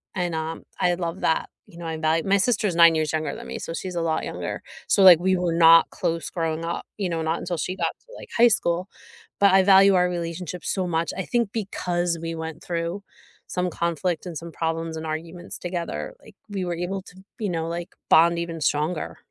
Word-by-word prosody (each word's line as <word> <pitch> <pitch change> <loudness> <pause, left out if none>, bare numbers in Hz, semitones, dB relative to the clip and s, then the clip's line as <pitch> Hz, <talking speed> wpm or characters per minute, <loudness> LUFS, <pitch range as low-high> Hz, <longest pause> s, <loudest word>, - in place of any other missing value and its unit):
and, 175 -3 -1
um, 160 +1 -4 0.2
I 180 -1 +3
love 170 +1 -4
that. 160 - +1 0.2
You 170 - -16
know, 170 - -7
I 160 - -3
value 160 +1 +1
my 200 +1 +4
sister's 210 -3 +1
9 170 -1 +7
years 155 -1 0
younger 155 0 -1
than - - -9
me, - - -5
so 165 - -5
she's 185 +1 -5
a 170 - 0
lot 160 -1 0
younger. - - -5 0.2
So, 200 - +4
like, 180 -4 +10
we 185 +1 +2
were 175 -2 0
not 165 0 +7
close 170 -3 -2
growing 165 -1 -2
up, 170 - -3
you 195 -3 -1
know, 165 -1 -2
not 160 +1 -1
until 175 -1 -3
she 185 +3 -3
got - - -1
to, - - -18
like, - - -11
high 240 - +7
school. 180 -3 0 0.5
But 200 -1 +6
I 190 0 +6
value 195 0 +7
our 180 0 +3
relationship 175 0 -5
so 185 -2 -1
much, 165 0 -1
I 190 - -1
think 235 -4 0
because 175 -5 -1
we 165 0 -4
went 160 0 -6
through 170 +3 -3 0.4
some 180 0 -1
conflict 170 +1 -2
and 170 -4 -5
some 170 0 -8
problems 165 0 -2
and 160 - -6
arguments 165 +3 -6
together, 175 - -4
like, - - -17
we 195 -2 -3
were 175 -1 -2
able 180 +3 -3
to, 185 0 -15 0.2
you 210 -4 -1
know, 165 -1 -2
like, 170 +1 -4 0.2
bond 170 +1 +5
even 165 -2 -4
stronger. 155 +4 -1
170 Hz, 220 wpm, -24 LUFS, 165-185 Hz, 0.5 s, like